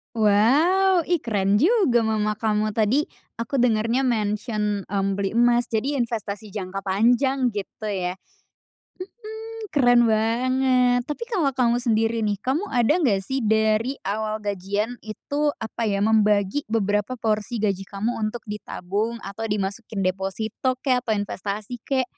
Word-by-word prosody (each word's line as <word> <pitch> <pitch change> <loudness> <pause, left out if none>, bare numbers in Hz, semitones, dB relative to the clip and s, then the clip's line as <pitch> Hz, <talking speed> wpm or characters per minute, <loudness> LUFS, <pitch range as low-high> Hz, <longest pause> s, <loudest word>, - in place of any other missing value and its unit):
Wow, 305 - +3
ih 345 -3 0
keren 200 -3 +1
juga 305 - +3
mama 215 -1 0
kamu. 215 -1 0
Tadi, 230 +7 +2 0.3
aku 230 +4 -3
dengernya 235 +1 +2
mention, 210 -3 -1
mmm, 195 0 -1
beli 195 0 -1
emas, 240 +1 +2
jadi 260 +6 0
investasi 215 -3 -5
jangka 195 -1 -5
panjang 245 +7 +2
gitu 210 0 -5
ya. 185 -2 -3
Mhm, - - -36 1.4
keren 245 -4 +5
banget, 245 +3 +2
tapi 300 +11 -4
kalo 390 - 0
kamu 240 -1 +2
sendiri 225 -1 +1
nih, 210 -2 0
kamu 310 +11 -1
ada 240 0 +2
nggak 200 - +1
sih 265 +4 -2
dari 220 +3 +1
awal 215 +2 -2
gajian 205 +4 -2
itu, 285 +7 -2
apa 225 0 -3
ya, 200 0 +1
membagi 210 +1 +3
beberapa 210 +2 0
porsi 220 +1 -1
gaji 195 -3 -1
kamu 215 +4 -3
untuk 215 +2 -3
ditabung 210 +1 -3
atau 225 +3 -5
dimasukin 205 0 -2
deposito 195 +7 -2
kek 255 -3 +3
atau 220 -4 -1
investasi 205 +3 -4
kek? 265 -2 +2
220 Hz, 140 wpm, -23 LUFS, 205-245 Hz, 1.4 s, keren